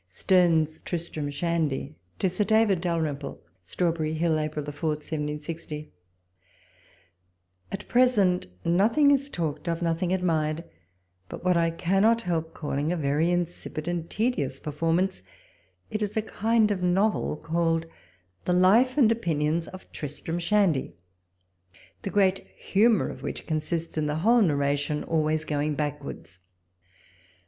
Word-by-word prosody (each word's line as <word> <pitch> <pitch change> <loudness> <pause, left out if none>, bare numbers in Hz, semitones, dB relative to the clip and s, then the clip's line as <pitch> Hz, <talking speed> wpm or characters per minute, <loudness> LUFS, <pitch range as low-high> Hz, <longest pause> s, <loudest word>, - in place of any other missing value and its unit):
^.. - - -45
STEnXE\S 160 - +2
" - - -34
TBISTRAM 165 -4 -3
SHANDY." 155 -2 -1 0.2
To - - +1
Sib 185 +3 -1
Davto 220 -1 +4
D.^lrymple. 160 -5 -2 0.2
Strawberry 160 - -1
Hill, 160 -1 +1
April 155 -1 -3
4, 145 +2 -3
1760.... 150 0 -5 1.8
At 195 - -6
present, 215 -8 +3 0.2
nothing 225 - +4
is 280 0 +2
talked 155 - -3
of, 165 0 -1
nothing 170 +2 0
admired, 165 -4 0 0.7
but - - -8
what 180 -1 +4
I 165 0 +3
cannot 195 +7 +2
help 165 -2 -2
calling 145 +1 -2
a 180 - 0
very 150 +2 +1
insipid 175 -3 -3
and 170 -1 -2
tedious 160 - -1
performance: 165 +5 -1 0.7
it 215 - -2
is 210 +1 -2
a 220 - +1
kind 220 0 +2
of 195 -3 -1
novel, 185 -1 +1
called 165 +1 0 0.3
" 90 0 -40
The 180 - +2
Life 220 +9 +4
and 235 -6 +5
Opinions 165 -6 0
of 185 - -12
Tristram 155 +3 -5
Shandy 175 -5 +1 0.5
"; 90 -1 -28
the - - -4
great 195 -1 +2
humour 220 +3 +3
of - - -10
which - - -5
consists 160 +1 -2
in 150 - 0
the 150 - -1
whole 235 +1 +6
narration 145 -3 +1
always 155 -1 0
going 150 0 -1
backwards. 145 -10 -5
165 Hz, 140 wpm, -26 LUFS, 150-190 Hz, 1.8 s, whole